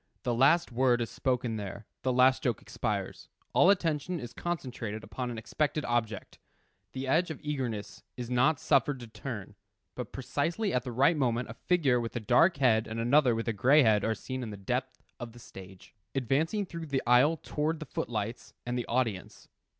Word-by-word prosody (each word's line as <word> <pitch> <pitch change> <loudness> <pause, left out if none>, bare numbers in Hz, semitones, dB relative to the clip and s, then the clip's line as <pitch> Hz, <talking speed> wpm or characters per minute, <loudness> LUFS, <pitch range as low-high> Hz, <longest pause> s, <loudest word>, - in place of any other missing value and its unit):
The 120 - 0
last 140 +7 +4
word 125 0 +3
is 115 -4 -3
spoken 125 -4 -1
there, 105 +1 -6 0.2
the 130 - 0
last 130 +1 +4
joke 120 -8 0
expires; - - -4 0.2
all 180 - +6
attention 170 -2 +1
is 120 -3 -8
concentrated 120 -10 -4
upon 125 -1 -5
an 120 - -5
expected 150 +6 -1
object. 115 -4 -2 0.5
The 130 0 -4
edge 165 +6 +2
of 160 - -6
eagerness 120 -8 -4 0.2
is 125 -1 -5
not 125 +5 +2
suffered 140 -3 +2
to 120 - -8
turn, 110 -2 -7 0.4
but 125 - -6
precisely 165 - -2
at 125 - +2
the 125 0 -6
right 135 +8 +4
moment 120 -5 0
a - - -7
figure 140 -3 +2
with 115 -1 -5
a - - 0
dark 130 - +4
head 115 -5 +3
and 110 +1 -5
another 125 +1 +4
with 115 +1 -3
a 115 - +1
gray 135 +8 +5
head 105 -3 +3
are 110 0 +1
seen 130 +2 -5
at 120 - -5
the 105 - -7
depth 125 +6 -3 0.2
of 120 -2 -7
the 120 - -13
stage, 95 -4 -13 0.2
advancing 155 - 0
through 165 -2 -7
the 140 -2 -1
aisle 130 +7 +5
towards 155 +2 -2
the 155 - -7
foot - - -4
lights 110 +1 -4
and 125 0 -2
the 120 - -4
audience. 115 -6 -2
125 Hz, 195 wpm, -30 LUFS, 115-145 Hz, 0.5 s, all